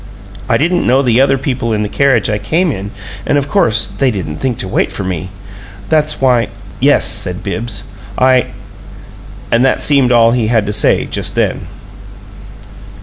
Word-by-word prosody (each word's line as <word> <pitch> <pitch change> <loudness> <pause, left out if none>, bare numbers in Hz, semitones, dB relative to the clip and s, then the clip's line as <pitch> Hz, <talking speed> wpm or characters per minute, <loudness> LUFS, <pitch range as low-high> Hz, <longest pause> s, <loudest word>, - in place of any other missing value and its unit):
I - - +3
didn't 175 +4 0
know 130 +3 +3
the 125 0 +3
other 135 0 +3
people 125 -4 -2
in 105 0 0
the - - -2
carriage 130 -2 +2
I 105 -1 -1
came 160 - 0
in, 100 -4 -5 0.3
and 145 - +1
of 140 -1 -1
course 115 - +2
they 135 - -1
didn't 90 -9 -4
think 125 +1 -2
to - - -3
wait 95 - -1
for 100 - -5
me. 90 -1 -4 0.6
That's 155 -1 +1
why 125 -3 +2 0.2
" - - -17
"Yes," - - +3
said - - -1
Bibbs, 110 -3 -4 0.3
"I 130 -1 +3 0.5
" - - -18
And 115 +2 +3
that 135 - +1
seemed 140 -4 +3
all 115 -1 +5
he 120 -2 0
had 110 -2 +1
to 105 - -3
say - - +2
just - - -4
then. - - -1
120 Hz, 185 wpm, -14 LUFS, 105-135 Hz, 0.6 s, all